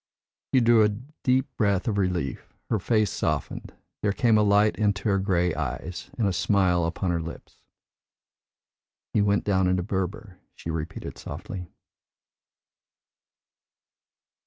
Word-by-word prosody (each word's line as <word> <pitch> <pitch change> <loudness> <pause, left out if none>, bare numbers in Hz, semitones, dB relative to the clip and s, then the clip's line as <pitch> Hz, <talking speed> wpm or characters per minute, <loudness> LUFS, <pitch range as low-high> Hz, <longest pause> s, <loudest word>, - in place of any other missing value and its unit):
She 130 - +4
drew 115 -1 +5
a 105 - +4
deep 130 +3 -1
breath 100 -2 +1
of 105 -3 +1
relief, 90 -8 -2 0.2
her 110 - +2
face 110 +1 +1
softened, - - -2 0.3
there 105 - +2
came 115 +2 +3
a 105 - +5
light 105 -1 +4
into 105 0 0
her 100 -1 +3
grey 90 -3 +1
eyes, 80 +4 -4
and 110 -4 +2
a 95 - 0
smile 90 -4 +2
upon 85 +2 -1
her 85 -1 0
lips. 80 +1 -9 1.6
"He 105 - +3
went 100 0 +2
down 95 -2 +2
into 90 -1 +1
Berber," 95 +1 -4 0.2
she 80 - -5
repeated 80 0 -5
softly. 90 -2 -7
100 Hz, 135 wpm, -26 LUFS, 90-105 Hz, 1.6 s, drew